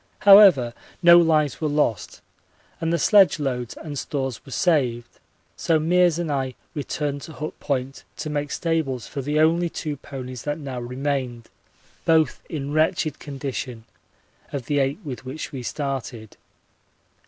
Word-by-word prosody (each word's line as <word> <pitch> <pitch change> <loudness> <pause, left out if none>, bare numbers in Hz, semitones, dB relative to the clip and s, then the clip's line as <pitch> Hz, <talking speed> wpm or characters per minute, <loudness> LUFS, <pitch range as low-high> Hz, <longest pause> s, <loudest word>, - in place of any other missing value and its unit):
However, 195 - +7 0.3
no 170 0 +9
lives 155 -5 +2
were 155 - +1
lost 145 - -1 0.6
and 165 0 -1
the 170 - +2
sledge 200 -1 +5
loads 125 -5 -3
and 145 -3 -6
stores 135 -5 -4
were 135 - -13
saved, 125 -8 0 0.4
so 165 - +1
Meares 175 +1 +3
and 170 -3 -2
I 130 -3 -2 0.2
returned 145 -1 -3
to 160 - -9
Hut 155 +1 -6
Point 135 -1 -3
to 155 - -5
make 145 -1 -2
stables 145 -8 -1
for 140 - -5
the 145 +3 -1
only 170 +2 +3
two 150 -2 -5
ponies 130 -3 -8
that 145 +3 -3
now 135 -5 -6
remained, 125 -1 -3 0.5
both 160 -4 +2
in 145 -2 -4
wretched 155 -1 +1
condition, 135 -4 -5 0.7
of 135 -4 -4
the 145 +2 0
eight 135 +1 0
with 135 -4 -7
which 135 +4 -6
we 135 - -6
started. 125 -5 -5
145 Hz, 150 wpm, -23 LUFS, 130-160 Hz, 0.7 s, no